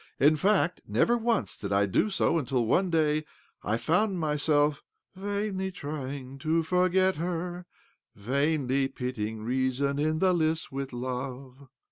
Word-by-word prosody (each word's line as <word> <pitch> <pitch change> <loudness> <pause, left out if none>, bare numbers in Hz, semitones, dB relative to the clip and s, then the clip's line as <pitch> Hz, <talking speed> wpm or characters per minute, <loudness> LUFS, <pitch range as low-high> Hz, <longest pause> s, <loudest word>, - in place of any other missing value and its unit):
In 150 +3 +5
fact, 185 +1 +2
never 240 - +3
once 235 -1 0
did 100 - -6
I 100 0 +3
do 100 - +1
so 180 -4 +2
until 125 -4 0
one 185 - +2
day 155 -2 +2 0.4
I 110 +3 0
found 180 - +1
myself 150 -1 +1 0.2
' - - -49
vainly 200 -1 -2
trying 140 -4 -6
to 160 +3 +1
forget 185 +2 +2
her, 175 +1 -3 0.5
vainly 135 +4 0
pitting 110 -5 -4
reas<fii 130 +3 0
in 155 +1 +1
the 185 +2 +3
lists 160 -1 0
with 135 0 -4
love.' 130 +2 -6
150 Hz, 140 wpm, -28 LUFS, 130-180 Hz, 0.5 s, In